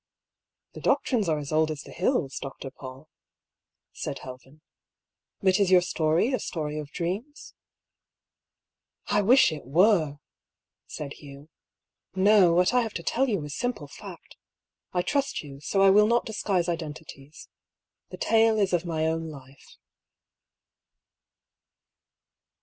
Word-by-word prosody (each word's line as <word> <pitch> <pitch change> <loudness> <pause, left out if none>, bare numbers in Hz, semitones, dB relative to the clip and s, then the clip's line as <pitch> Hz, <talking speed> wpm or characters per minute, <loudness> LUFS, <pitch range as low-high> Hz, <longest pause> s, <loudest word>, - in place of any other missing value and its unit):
" - - -64
The - - -10
doctrines 220 -9 +1
are 155 - +1
as 145 0 -6
old 155 0 +2
as 150 -2 -5
the - - -13
hills, 175 - -1
Dr. 135 0 -8
Paull," 130 +2 -11 0.9
said - - -5
Helven. 130 +4 -12 0.4
" - - -59
But 190 +1 +3
is 200 -2 +3
your 180 -1 +5
story 170 - +1
a 255 - +1
story 155 -3 -4
of 150 -1 -7
dreams? 195 - -5 0.5
" - - -65
" - - -65 0.3
I 205 0 +3
wish 240 0 +5
it 155 -2 -7
were 165 - +3
I 145 - -21 0.4
" - - -65 0.3
said 145 -1 -7
Hugh. 140 +1 -13 0.4
" - - -64 0.3
No, 195 -2 +5
what 180 +5 +3
I 250 - +4
have 225 -2 -5
to - - -4
tell 265 +2 0
you 195 -9 -1
is 145 0 -6
simple 245 -11 -3
fact. - - -12 0.5
I 180 -1 0
trust 280 - -1
you; 140 -2 -11
so 195 +7 +1
I 195 - +7
will 210 +2 +5
not 235 +1 +2
disguise 195 -5 -1
identities. 155 -3 -7 0.6
The - - -9
tale 225 0 +3
is 195 -3 +1
of 175 0 0
my 160 -2 -1
own 165 0 -1
life." 135 -2 -14
170 Hz, 155 wpm, -26 LUFS, 150-205 Hz, 0.9 s, I